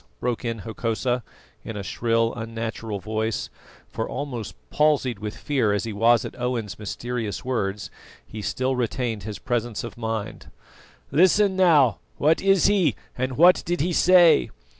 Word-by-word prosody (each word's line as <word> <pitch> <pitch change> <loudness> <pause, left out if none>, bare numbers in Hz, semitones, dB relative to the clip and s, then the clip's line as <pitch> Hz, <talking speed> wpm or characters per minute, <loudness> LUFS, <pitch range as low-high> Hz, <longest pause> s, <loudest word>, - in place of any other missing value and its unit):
broke 125 -1 -2
in 115 -3 -3
Hokosa, 115 +2 -1 0.4
in 110 - -6
a 100 - -4
shrill, 115 +3 0
unnatural 115 -2 -5
voice; 110 +2 -3 0.4
for 115 - -3
almost 125 -7 -5 0.2
palsied 145 -7 +2
with 105 0 -6
fear 125 -8 0
as 105 - -1
he 115 -2 -4
was 115 +3 +3
at - - -6
Owen's 120 -5 -3
mysterious 115 +1 -4
words, 105 -6 -2 0.3
he 110 - -8
still 130 +5 -1
retained 120 -3 -2
his 105 0 -6
presence 120 -2 -2
of 120 - -8
mind. 110 -2 -4 0.6
"Listen 190 +4 +4
now: 155 - +4 0.2
what 155 +3 +3
is 195 -2 +4
he, 190 - +3 0.2
and 130 0 -3
what 175 +4 +6
did 175 +1 -2
he 175 +4 0
say? 175 -3 +5
120 Hz, 150 wpm, -24 LUFS, 110-145 Hz, 0.6 s, what